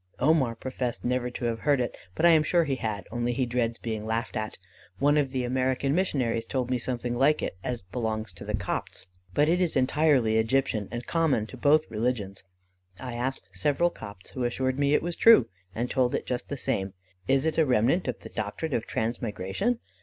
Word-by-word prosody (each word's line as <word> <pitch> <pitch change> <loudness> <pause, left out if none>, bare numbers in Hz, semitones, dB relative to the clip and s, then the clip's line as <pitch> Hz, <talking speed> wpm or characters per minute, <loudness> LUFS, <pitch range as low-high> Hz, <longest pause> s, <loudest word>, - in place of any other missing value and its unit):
"Omar 135 -4 +3
professed 125 0 -4
never 125 0 0
to 120 0 -5
have 115 -1 -1
heard 145 0 +2
it, 120 - -2 0.2
but 170 - +2
I - - +8
am 160 -1 +6
sure 170 +3 +3
he 135 -4 -1
had, 105 -5 -3
only 120 0 -1
he 130 +1 0
dreads 120 -1 -1
being 110 -2 -4
laughed 110 +1 -2
at. 110 0 -3 0.4
One 145 +2 +3
of 145 -3 +2
the 130 -1 -2
American 130 +2 0
missionaries 125 -10 0
told 130 -2 -2
me 125 - +1
something 120 0 -2
like 140 +5 +3
it, - - -3
as 120 -5 -3
belonging 110 +3 -3
to - - -8
the 105 +1 -2
Copts; 95 -1 -3 0.3
but 145 +1 +4
it 175 +3 +2
is 175 -3 +1
entirely 130 -4 +3
Egyptian, 110 -3 +1
and 120 +1 -5
common 160 -10 +1
to - - -10
both 155 +2 +4
religions. 110 -4 -2 0.6
I 125 -2 -6
asked 125 +1 -2
several 145 - +1
Copts, 100 - -10
who 130 - -3
assured 130 +2 -1
me 140 +1 +3
it - - +1
was 175 0 -2
true, 225 - +7 0.3
and 120 +2 -1
told 125 -2 +1
it - - -3
just 125 -1 -3
the 140 - -3
same. 95 -5 -2 0.3
Is 135 +2 +3
it 160 0 +1
a 160 - +5
remnant 125 - +2
of 125 - -3
the - - -9
doctrine 110 +8 -4
of 115 - -1
transmigration? 115 - -1
125 Hz, 205 wpm, -27 LUFS, 115-140 Hz, 0.6 s, I